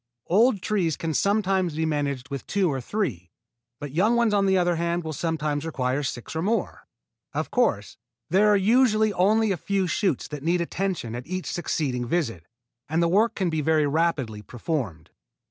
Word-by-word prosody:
Old 210 +2 +3
trees 180 -8 0
can 165 -1 -3
sometimes 195 -3 +1
be 160 +1 0
managed 140 -4 -2
with 140 -1 -6
two 190 -5 +1
or 135 - -3
three, 125 - -3 0.5
but 145 -2 -6
young 200 - +2
ones, 235 -3 +2
on 200 -1 +3
the 190 0 +3
other 175 -1 +2
hand, 170 +1 -1
will 160 0 -4
sometimes 150 -1 -2
require 135 -4 -1
six 125 0 -5
or 160 - -1
more. 220 +6 -2 0.5
Of - - -2
course, 100 - 0 0.3
there 195 +5 +4
are 210 -1 +5
usually 215 0 +3
only 215 +4 +3
a 190 - 0
few 195 +2 -1
shoots 180 - 0
that 150 -2 -6
need 170 +4 +1
attention 175 -8 -2
at 120 +3 -6
each 185 +1 -4
succeeding 130 -8 -2
visit, 115 - -2 0.4
and 165 +2 +1
the - - +3
work 210 +7 +2
can 185 -4 0
be 160 -1 0
very 155 0 +2
rapidly 140 -8 0
performed. 115 - -4
170 Hz, 180 wpm, -25 LUFS, 145-195 Hz, 0.5 s, are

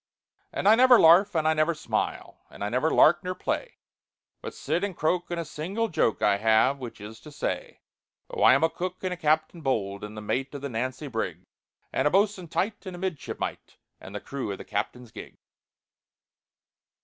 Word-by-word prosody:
"And - - -2
I 210 - +8
never 250 +1 +7
larf, 175 +5 +6
and 155 -1 +2
I 160 - +4
never 155 +2 +1
smile, - - -3
And - - -8
I 105 - -1
never 125 +8 +1
lark 175 +2 +5
or 185 0 -3
play, - - -3 0.6
But - - -7
sit 175 - -2
and 200 -4 -3
croak, 175 +3 0
and 175 -1 -3
a 165 - -3
single 190 +10 -3
joke 115 -9 0
I 100 -1 +4
have, 110 +6 +3
which 120 -4 -8
is 105 +2 -10
to 150 - -13
say: - - -4 0.5
"Oh, - - -6
I 130 - +7
am 140 - +1
a 160 - +4
cook 185 +1 -5
and 185 -1 -1
a - - -4
captain 155 0 0
bold, 100 -8 -2
And 105 +1 -8
the - - -4
mate 135 +6 -2
of 140 - -6
the 140 - -4
Nancy 130 +5 -3
brig, 115 -4 -4 0.5
And 135 - +2
a - - +4
bos'un 195 0 +1
tight, 200 +6 -2
and 185 - -6
a - - -9
midshipmite, 185 -5 -5 0.2
And 95 - -11
the - - -3
crew 130 -1 -5
of 100 - -5
the - - -10
captain's 115 +3 -4
gig." - - -11
155 Hz, 205 wpm, -26 LUFS, 120-180 Hz, 0.6 s, I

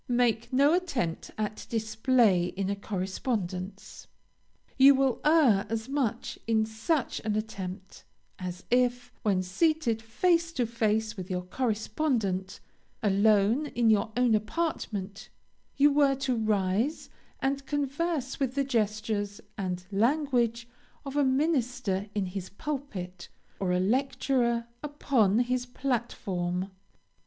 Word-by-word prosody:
Make 240 -2 +1
no 280 +4 +4
attempt 275 - -1
at 215 0 -4
display 220 -4 +2
in 195 +2 -2
a - - -1
correspondence. 195 -1 -4 0.7
You 275 +1 +8
will 265 -2 +1
err 290 -11 +4
as 225 +1 -3
much 260 -5 -2
in 220 -1 +3
such 225 +7 -1
an 215 -1 -2
attempt, 195 -3 -5 0.4
as 180 -1 -6
if, 245 0 +2
when 195 -3 +1
seated 235 - +1
face 335 +9 +1
to 250 -5 0
face 220 -1 0
with 185 -2 -7
your 180 -1 -2
correspondent, 215 -2 -1 0.4
alone 210 +6 +3
in 235 -5 +2
your 215 +1 +2
own 245 -2 +4
apartment, 215 - -2 0.5
you 290 +1 +6
were 280 -1 +4
to 265 -2 -1
rise 215 +5 0 0.3
and 275 +1 -1
converse 290 0 -2
with 265 -2 -1
the 280 - +2
gestures 215 -4 -1 0.2
and 180 -2 -3
language 235 0 +1 0.4
of 275 0 -6
a 290 - +3
minister 250 - 0
in 200 -2 0
his 185 0 -5
pulpit, 200 -9 -6 0.3
or 190 -2 0
a 180 - +2
lecturer 240 +2 +1 0.2
upon 275 -8 +1
his 250 0 -1
platform. 195 -8 -2
225 Hz, 120 wpm, -28 LUFS, 200-270 Hz, 0.7 s, You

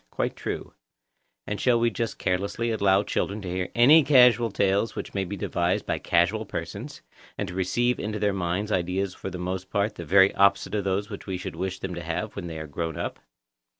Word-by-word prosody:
Quite - - -2
true. - - -5 0.7
And 105 - -4
shall 120 -2 +3
we 120 0 +2
just 115 +1 -3
carelessly 100 +5 -1
allow 100 -2 +3
children 100 0 -2
to - - -6
hear 90 0 -2
any 145 +7 +7
casual 125 -4 +5
tales 100 +2 +1
which - - -6
may 95 -1 -1
be 100 +3 -5
devised 85 0 -1
by - - -1
casual - - +2
persons, - - -7 0.3
and - - -2
to - - -7
receive 120 +7 0
into 105 +1 -3
their 105 -1 +1
minds 95 +3 -2
ideas 90 +1 -1
for - - -6
the 90 - -6
most 90 +1 -4
part 100 +1 0
the 85 - -5
very 95 +4 +5
opposite 100 +1 +3
of 105 -2 -1
those 100 +2 -1
which 100 - -8
we 95 -1 -2
should 90 - -6
wish 95 0 -3
them 95 -1 -5
to 85 - -5
have 85 +6 -4
when 90 -3 -5
they 80 -1 -6
are 80 - -5
grown 80 +1 -4
up? - - -4
100 Hz, 215 wpm, -26 LUFS, 90-105 Hz, 0.7 s, any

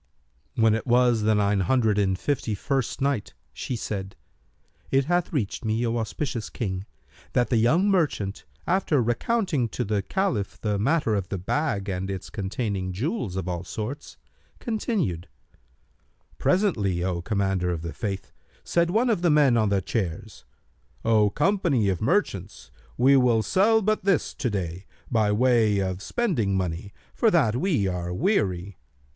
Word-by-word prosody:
When 110 -2 +4
it 115 +4 -2
was 120 -2 +4
the 110 +1 +3
Nine 100 -1 +2
Hundred 110 +1 +2
and 95 -2 +1
Fifty 120 -3 -1
first 135 +4 -2
Night, 135 -7 -1 0.2
She 95 - -4
said, 100 -4 -5 0.7
It 135 0 +2
hath 175 +2 0
reached 120 -10 -2
me, 110 +2 0
O 115 0 0
auspicious 115 +1 -3
King, 95 -4 -4 0.5
that 120 +1 +1
the 120 - +4
young 155 - +3
merchant, 150 - 0 0.2
after 175 -5 +2
recounting 130 - 0
to 120 - -3
the 105 -2 0
Caliph 120 - -2
the 105 -2 -1
matter 135 0 +1
of 100 -3 -2
the 100 - -2
bag 100 - -1
and 95 0 -3
its 95 -1 -5
containing 100 -2 -3
jewels 115 - -2
of 95 -2 -3
all 90 -1 -3
sorts, 110 +9 -6 0.4
continued, 205 - -2 1.1
"Presently, 105 - +1
O 90 -2 -1
Commander 95 -2 0
of 85 -2 -3
the 85 -2 -5
Faithful, 95 +3 -4 0.3
said 170 0 +1
one 225 +7 +2
of 205 - 0
the 175 - +3
men 145 -5 +5
on 110 -3 +2
the 100 -2 +1
chairs, 100 0 -4 0.6
'O 110 -2 +4
company 165 - +1
of 95 -3 -1
merchants, 110 - -1 0.3
we 135 +3 +5
will 120 -4 +4
sell 215 - +3
but 215 +2 +1
this 195 -4 +1
to 135 -4 -2
day, 95 -2 -4 0.2
by 110 -3 +2
way 110 -2 +3
of 95 -1 -2
spending 115 - 0
money, 90 +2 -3 0.2
for 230 - +3
that 145 - +3
we 135 - +1
are 90 -1 -3
weary.' 95 - 0
110 Hz, 155 wpm, -25 LUFS, 95-145 Hz, 1.1 s, men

